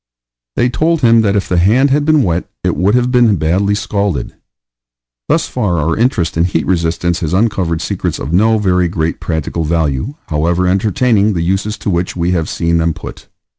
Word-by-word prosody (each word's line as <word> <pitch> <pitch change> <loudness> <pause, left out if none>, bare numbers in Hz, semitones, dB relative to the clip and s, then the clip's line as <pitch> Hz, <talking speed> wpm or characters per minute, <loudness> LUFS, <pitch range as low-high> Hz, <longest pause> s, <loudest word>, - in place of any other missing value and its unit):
They 120 - +2
told 160 +6 0
him 115 -2 +5
that 100 -2 +1
if 100 - 0
the 90 - +1
hand 120 +10 +3
had 145 +1 +1
been 155 -3 +3
wet 85 -1 -2
it - - 0
would 100 +5 +1
have 125 0 +1
been 120 -4 +4
badly 95 +5 0
scalded. 100 - -2 1.0
Thus - - +1
far 90 -5 -1
our 80 +1 0
interest 110 -8 0
in 85 +1 +2
heat 85 -3 -1
resistance 85 0 0
has 80 -1 -3
uncovered 95 -6 0
secrets - - -3
of 70 +6 -5
no 110 +5 +3
very 90 -4 +1
great 85 -2 -2
practical 80 0 -3
value, 80 - -1
however 85 +4 0
entertaining 105 +3 +1
the 85 -2 -1
uses 95 +4 -1
to 100 - -3
which 85 +1 -2
we 85 0 -1
have 85 -3 -1
seen 85 0 0
them 80 -1 0
put. - - -10
90 Hz, 190 wpm, -14 LUFS, 85-110 Hz, 1.0 s, him